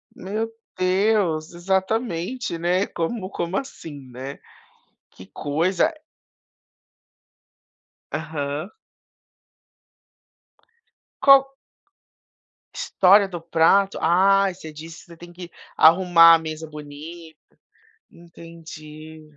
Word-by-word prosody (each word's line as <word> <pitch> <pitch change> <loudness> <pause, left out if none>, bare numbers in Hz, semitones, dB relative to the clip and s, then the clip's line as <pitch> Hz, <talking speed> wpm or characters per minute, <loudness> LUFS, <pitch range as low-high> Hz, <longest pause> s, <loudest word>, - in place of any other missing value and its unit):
Meu 220 +4 -4 0.3
Deus, 185 -4 +1
exatamente, 190 +2 -2
né, 180 +3 0
como 185 +3 -4
como 180 0 -3
assim, 145 - -8
né? 130 +3 -8 0.7
Que 95 - -15
coisa, 160 - 0
a - - -9 2.2
Aham. 155 +2 -4 2.5
Qual 270 0 +6 1.2
História 195 +2 +3
do 175 -3 -7
prato? 170 +4 +2
Ah, 195 +3 +3
você 160 -3 -11
disse 160 +2 -11
que - - -19
você 170 -2 -15
tem 175 +1 -13
que 175 0 -10 0.3
arrumar 165 0 +7
a - - 0
mesa 160 0 -7
bonita, 155 +2 -11 0.7
entendi. 160 -2 -13
170 Hz, 85 wpm, -22 LUFS, 160-190 Hz, 2.5 s, arrumar